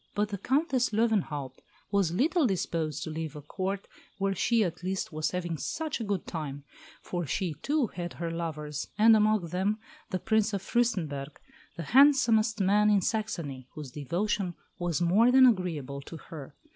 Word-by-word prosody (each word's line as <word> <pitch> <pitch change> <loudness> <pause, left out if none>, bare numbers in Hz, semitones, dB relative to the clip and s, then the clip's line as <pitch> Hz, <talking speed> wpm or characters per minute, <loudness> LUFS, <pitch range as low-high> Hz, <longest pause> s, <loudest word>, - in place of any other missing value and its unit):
But 210 0 +1
the 200 -2 -4
Countess 265 - +1
Löwenhaupt 195 - 0 0.3
was 200 -5 +2
little 295 - +2
disposed 165 - -2
to 160 - -5
leave 160 -1 -5
a 150 - -7
Court 190 +5 -3 0.3
where 195 0 0
she 225 +4 +2
at 175 -2 -3
least 185 -2 -3
was 155 0 0
having 175 -3 -3
such 320 -4 -3
a - - -3
good 200 -4 -2
time; 145 -4 -5 0.4
for 175 -3 -3
she, 175 +4 -1
too, 295 -2 +1
had 175 -5 -6
her 170 -1 -4
lovers, 155 -3 -4
and 220 +1 +7
among 210 -5 +2
them 190 +5 0 0.3
the 185 - -1
Prince 215 +2 +1
of 195 -1 -2
Fürstenberg, 165 - -1 0.4
the 170 - -4
handsomest 245 -6 +5
man 205 +2 +4
in 205 -2 +4
Saxony, 170 - -3
whose 150 -4 -7
devotion 175 +6 -2 0.2
was 175 -1 -1
more 205 +8 +4
than 260 0 +8
agreeable 160 - 0
to 165 +4 -9
her. 150 -2 -10
185 Hz, 170 wpm, -29 LUFS, 160-220 Hz, 0.4 s, than